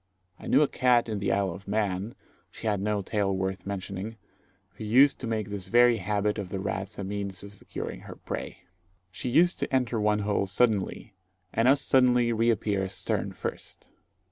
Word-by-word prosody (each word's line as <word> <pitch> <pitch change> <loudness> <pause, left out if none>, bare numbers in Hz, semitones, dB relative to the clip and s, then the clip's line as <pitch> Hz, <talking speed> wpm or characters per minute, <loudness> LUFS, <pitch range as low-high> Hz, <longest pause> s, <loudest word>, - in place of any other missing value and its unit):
I - - -9
knew 150 - +5
a - - +2
cat 125 -3 +3
in 110 -2 -3
the 100 - 0
Isle 100 -2 +1
of 100 - -12
Man 100 0 -1 0.3
she - - -11
had 105 -3 +1
no 105 0 -1
tail 100 -1 0
worth 95 +1 -3
mentioning 100 +2 -5 0.6
who - - -10
used 130 +6 +5
to 125 - -4
make 110 -3 -2
this 100 -2 -4
very 120 0 +5
habit 105 +1 -1
of 95 -3 -5
the 95 - -4
rabbits 95 +1 -4
a 100 - -4
means 100 -1 -4
of 100 0 -10
securing 100 - -7
her - - -10
prey. - - -6 0.5
She 110 +7 -4
used 175 +8 +3
to - - -2
enter 125 -4 +1
one 105 0 +3
hole 100 -1 0
suddenly, 105 -1 0 0.4
and 115 +2 +2
as 140 +1 +5
suddenly 125 -2 +3
reappear 110 -4 +1
stern - - -2
first. - - -7
105 Hz, 185 wpm, -27 LUFS, 100-120 Hz, 0.6 s, knew